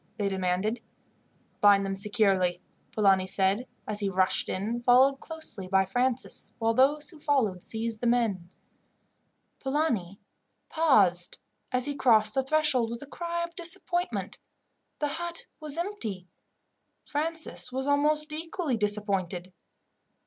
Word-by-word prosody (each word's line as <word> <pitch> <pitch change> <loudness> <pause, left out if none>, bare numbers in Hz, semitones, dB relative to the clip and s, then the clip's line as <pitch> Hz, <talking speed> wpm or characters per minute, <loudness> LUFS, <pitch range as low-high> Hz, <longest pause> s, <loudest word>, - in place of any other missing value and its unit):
they 205 - 0
demanded. 190 +4 -1 0.8
"Bind 200 -1 +5
them 195 - -2
securely," 195 -3 +2 0.3
Polani 195 -3 +3
said, 195 +5 +1 0.2
as 210 -1 -2
he 200 -2 0
rushed 185 0 +1
in, 220 +5 -2
followed 260 +3 +5
closely 315 - -3
by 190 0 +3
Francis, 245 +6 -2
while 225 0 +1
those 290 +5 +2
who 320 - -15
followed 255 -12 0
seized 225 +1 -3
the 240 - 0
men. 220 -8 0 1.1
Polani 245 - -1 0.5
paused 200 - +3 0.3
as 255 0 0
he 290 - -2
crossed 220 -6 +4
the 265 - +2
threshold, 270 -4 +2
with 235 +3 -6
a - - -9
cry 340 +3 -4
of 340 0 -6
disappointment 350 0 -2 0.6
the 295 - -1
hut 340 +3 -5
was 305 0 -4
empty. 230 - -4 0.8
Francis 315 -3 0
was 265 +1 -3
almost 300 +2 +2
equally 320 -4 -3
disappointed. 195 -4 -1
235 Hz, 125 wpm, -28 LUFS, 195-300 Hz, 1.1 s, Bind